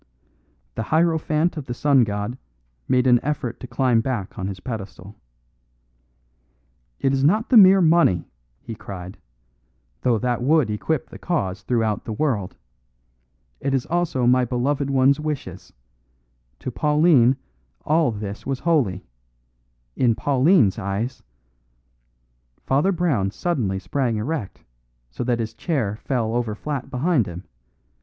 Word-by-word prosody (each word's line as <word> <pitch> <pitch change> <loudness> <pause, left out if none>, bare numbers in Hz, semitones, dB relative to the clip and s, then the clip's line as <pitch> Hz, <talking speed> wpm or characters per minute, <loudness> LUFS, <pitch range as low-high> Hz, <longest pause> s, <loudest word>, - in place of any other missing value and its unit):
The - - -4
hierophant 160 +3 +1
of 145 - -5
the 120 - -4
sun 140 -1 +4
god 105 +3 -3 0.5
made 125 0 +2
an 125 -2 +5
effort 130 -5 -3
to 125 - -8
climb 120 -1 +2
back 120 -6 -4
on 95 - -2
his 95 -2 -6
pedestal. 100 -3 -7 1.8
"It 135 - +1
is 135 0 0
not 210 +10 +2
the 250 - +6
mere 195 -2 +8
money," 160 - +3 0.4
he 115 - -6
cried, 95 -3 -9 0.8
"though 120 -2 +2
that 120 +1 -1
would 140 -3 +2
equip 135 +7 -2
the - - -10
cause 95 - -2
throughout 110 -4 -1
the 110 - -4
world. 110 -7 -1 1.0
It 135 0 -1
is 130 - -1
also 170 -7 0
my 125 +1 +4
beloved 135 +3 -1
one's 135 +1 +3
wishes. 150 -2 -5 0.9
To 130 - -4
Pauline 150 -3 +3 0.5
all 155 -3 +2
this 105 -1 -6
was 135 -1 -3
holy. 130 - +1 0.9
In 120 -3 +2
Pauline's 135 - +3
eyes 105 +6 -3 0.7
" - - -44
Father 145 +9 +2
Brown 160 - 0
suddenly 110 - -2
sprang 120 +2 -1
erect, 115 -1 -4 0.5
so - - -4
that 120 -1 +1
his 115 -1 -4
chair 120 - -2
fell 115 -3 -2
over 120 -3 -1
flat 140 +2 -5
behind 135 - +1
him. 90 +2 -8
125 Hz, 135 wpm, -22 LUFS, 105-150 Hz, 1.8 s, mere